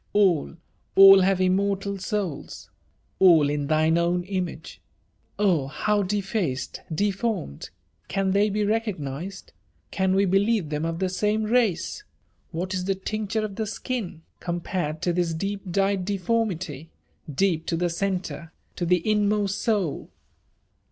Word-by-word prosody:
All, 185 -7 +2 0.4
all 195 0 +10
have 190 0 +2
immortal 195 +1 0
souls 185 -5 -4 0.2
!— - - -41
>A11 160 -6 +6
in 145 -1 -2
thine 155 +2 +3
own 175 +1 +1
image! 180 -3 -5 0.3
— - - -45 0.2
Oh! 180 -10 +2
how 205 +8 0
defaced, 195 - -2
deformed! 200 - -2 0.2
— - - -44
Can 195 -1 0
they 200 +2 +3
be 210 +1 0
recognised? 195 - -3 0.2
— - - -42
Can 190 -1 +1
we 200 +1 +3
be« 195 +1 +3
lieve 205 -6 0
them 150 +1 -2
of 165 0 -2
the 190 +1 0
same 210 +4 0
race? 220 - 0 0.2
— - - -42
^What 180 +2 -3
is 185 -1 -2
the 195 0 0
tincture 215 +2 -2
of 200 -2 -7
the 220 -1 -2
skin, 205 -7 -4 0.2
com 175 0 -3
pared 160 -4 -3
to 175 - +1
this 170 -2 0
deep 195 +2 -4
dyed 195 0 +1
deformity? 185 - -2 0.2
— 155 - -13
deep 170 -5 +1
to 165 - 0
the 175 0 0
centre, 180 -2 -3 0.3
to 175 - -1
the 180 +1 +2
inmost 210 -1 +1
soul!" 205 - -1
190 Hz, 160 wpm, -25 LUFS, 170-205 Hz, 0.4 s, all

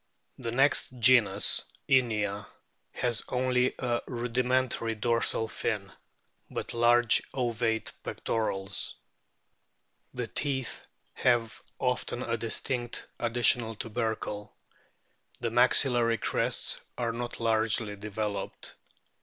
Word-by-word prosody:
The 120 -3 -3
next 135 +4 +3
genus, 115 -5 +5 0.3
INIA, 105 -6 +1 0.5
has 120 -3 +1
only 125 0 +1
a 120 -2 -1
rudimentary 125 -1 0
dorsal 115 0 0
fin, 100 -3 -3 0.6
but - - -4
large 120 0 +5
ovate 120 -3 0
pectorals. 100 -4 -2 1.2
The 125 -1 -2
teeth 130 +2 -3 0.3
have 120 -3 +1 0.2
often 125 -1 -1
a 115 - -1
distinct 120 +2 -2
additional 120 -1 +2
tubercle. 110 -2 -3 0.8
The 115 -2 -2
maxillary 120 -1 +4
crests - - 0 0.2
are 115 -2 -1
not 120 +1 -5
largely 110 -2 +1
developed. 105 0 -4
115 Hz, 90 wpm, -29 LUFS, 110-125 Hz, 1.2 s, genus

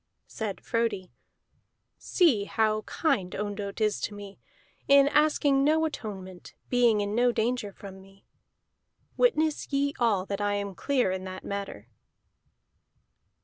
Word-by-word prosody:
Said 215 -4 -5
Frodi: 225 -6 -2 0.9
"See 270 - +2
how 215 0 +1
kind 190 - -1
Ondott 205 0 -4
is 210 -2 0
to 210 - -3
me, 200 -1 -10 0.5
in 280 0 +6
asking 290 -2 +3
no 315 +2 +3
atonement, 190 - -7 0.2
being 240 -4 +4
in 205 0 -2
no 245 +2 +3
danger 235 -2 -1
from 190 -1 -11
me. 195 +1 -20 0.9
Witness 315 -14 +1
ye 280 0 +1
all 210 -6 +2
that 200 0 -4
I 205 0 0
am 200 -1 -3
clear 255 -1 0
in 185 0 -4
that 185 0 -7
matter." 200 - -6
210 Hz, 130 wpm, -27 LUFS, 200-270 Hz, 0.9 s, in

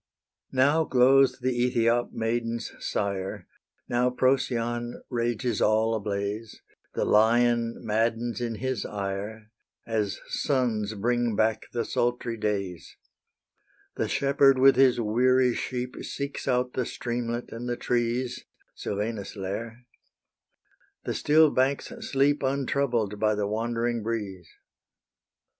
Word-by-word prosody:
Now 140 +5 +3
glows 135 0 +4
the 130 - +1
Ethiop 120 -1 +1
maiden's 115 +1 -2
sire; 95 -1 -3 0.4
Now 120 +1 +2
Procyon 120 -2 0
rages 120 -2 -1
all 110 +1 +3
ablaze; 105 +1 -3 0.4
The - - 0
Lion 115 +2 +3
maddens 115 +2 0
in 115 -2 -2
his 130 -1 -2
ire, 105 +2 -5 0.3
As 105 -3 -1
suns 115 -7 0
bring 120 +1 0
back 110 +1 +1
the 120 -1 -2
sultry 120 -1 -1
days: 100 -6 -3 1.0
The - - -1
shepherd 140 -1 +3
with 135 0 +6
his 130 -1 +4
weary 125 +3 +3
sheep 125 0 -4
Seeks 140 0 -5
out 125 -1 +1
the 125 - -1
streamlet 120 0 -4
and 120 +2 -5
the 120 - -2
trees, 120 +1 -1 0.3
Silvanus' 105 +1 -4
lair: 115 +5 -5 1.2
the - - -2
still 155 0 +4
banks 135 - 0
sleep 145 -9 +1
Untroubled 130 -6 0
by 110 0 +2
the 105 0 -1
wandering 115 +2 -1
breeze. 105 -5 -4
120 Hz, 115 wpm, -27 LUFS, 110-125 Hz, 1.2 s, with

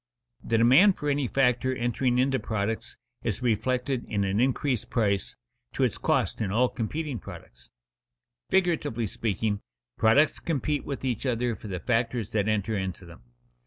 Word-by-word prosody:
_The 115 - +1
demand 135 - +6
for 150 - -2
any 140 -2 0
factor 130 0 +2
entering 120 0 0
into 130 +1 +2
products 110 0 -3 0.2
is - - -2
reflected, 125 +3 0
in 100 -1 -1
an 100 +2 0
increased 130 -1 0
price, 100 -6 0 0.4
to - - 0
its - - 0
cost - - 0
in 105 - -1
all 125 +4 +3
competing 135 +3 -3
products._ - - -12 0.8
Figuratively 160 -11 +1
speaking, 105 0 -2 0.4
products 125 +8 +4
compete 150 -2 -1
with 140 -1 -5
each 125 +1 -1
other 120 -1 0
for 105 - -10
the 95 -3 -4
factors 115 +3 -1
that 105 -2 0
enter 110 0 0
into 95 -2 -4
them. 85 -6 -13
120 Hz, 155 wpm, -27 LUFS, 105-130 Hz, 0.8 s, demand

